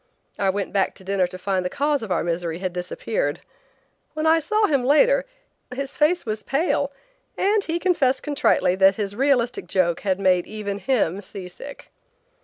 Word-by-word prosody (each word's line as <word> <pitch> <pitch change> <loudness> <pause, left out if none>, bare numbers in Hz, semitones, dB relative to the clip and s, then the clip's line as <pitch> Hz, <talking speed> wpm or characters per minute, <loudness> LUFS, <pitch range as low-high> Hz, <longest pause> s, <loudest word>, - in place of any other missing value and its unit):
I 195 - +2
went 200 +1 -2
back 195 -1 +1
to 190 - -14
dinner 190 -1 +1
to 185 - -9
find 185 0 -1
the 180 - -2
cause 290 +4 0
of 220 -4 -6
our - - +1
misery 170 -1 -2
had 185 -1 -4
disappeared. 180 -3 -3 0.7
When 310 +1 -2
I 325 +1 +5
saw 430 +7 +1
him 280 -8 +1
later, - - +4 0.5
his 275 +2 -5
face 330 +4 +2
was 215 -1 -3
pale 280 -1 0 0.5
and 410 +1 +2
he 330 +1 -1
confessed 330 -8 +1
contritely 275 -10 +2
that 195 0 +5
his 205 -1 -3
realistic 250 -1 +1
joke 175 -3 +1
had 190 -2 -1
made 185 -2 +2
even 205 -2 -5
him 200 -5 0
seasick. 195 +8 -10
215 Hz, 175 wpm, -23 LUFS, 185-285 Hz, 0.7 s, I